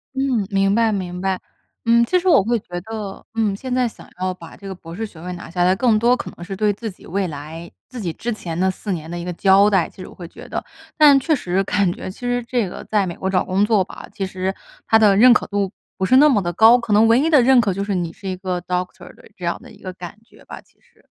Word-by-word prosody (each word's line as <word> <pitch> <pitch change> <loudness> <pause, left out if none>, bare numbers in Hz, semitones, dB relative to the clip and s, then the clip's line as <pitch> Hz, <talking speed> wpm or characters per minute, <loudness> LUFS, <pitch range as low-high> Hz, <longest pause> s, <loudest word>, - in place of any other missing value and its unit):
嗯， 265 -6 0
明 195 0 +2
白， 230 -1 +3
明 180 -3 -4
白。 190 -1 -1 0.5
嗯， 235 0 +4
其 365 +9 +2
实 365 - -4
我 335 - +5
会 235 +3 0
觉 175 -3 -7
得， 210 -1 -7
嗯， 220 -3 0
现 255 +5 -5
在 250 -1 +2
想 225 - -12
要 185 0 -1
把 170 -2 -13
这 195 - -11
个 190 - -6
博 165 -2 -11
士 225 +5 -4
学 180 -6 -13
位 180 +1 -6
拿 175 - -9
下 175 +1 0
来， 180 +1 +4
更 225 +1 +3
多 240 +3 +3
可 - - -6
能 175 - -10
是， 195 +3 -6
对 210 +1 +1
自 220 +2 -6
己 185 - -17
未 190 +2 -1
来 160 +2 -8 0.2
自 255 - -9
己 175 -4 -2
之 240 - -4
前 170 -5 -6
的 190 +1 +2
4 195 +2 -5
年 160 -3 -4
的 175 - -5
一 170 - -5
个 180 - -4
交 195 +3 +5
代， 190 -5 +2
其 - - -14
实 - - -8
我 - - -13
会 175 - -9
觉 - - -13
得。 - - -3 0.3
但 295 -3 +7
确 310 +4 0
实 195 -8 0
感 195 -2 +1
觉 185 - -7
其 - - -16
实 245 0 -1
这 235 -3 -1
个 - - -8
在 205 -3 0
美 170 - -5
国 190 - -3
找 190 0 +1
工 190 +2 +1
作 210 -3 +3
吧， - - -11
其 195 - -3
实 190 0 -3 0.3
它 225 - +4
的 210 -3 +5
认 245 +5 +7
可 - - 0
度 200 -2 -1 0.3
不 190 - 0
是 255 +7 +5
那 295 +3 +7
么 225 -8 +3
地 175 -2 -2
高， 225 +6 +7
可 235 -3 -5
能 215 +2 +5
唯 230 +1 +5
一 300 +5 +2
的 300 -5 +6
认 260 +1 +5
可 205 -4 0
就 195 +2 -3
是， 200 -1 -2
你 175 -2 -2
是 195 - -10
一 185 - -2
个 185 -1 -3
Doctor 180 0 -5
的 - - -20
这 180 - -7
样 170 - -1
的 - - -14
一 - - -17
个 185 -1 -7
感 180 +2 -9
觉 225 - -21
吧， - - -10
其 - - -34
实。 - - -30
195 Hz, 320 characters per minute, -20 LUFS, 180-230 Hz, 0.5 s, 但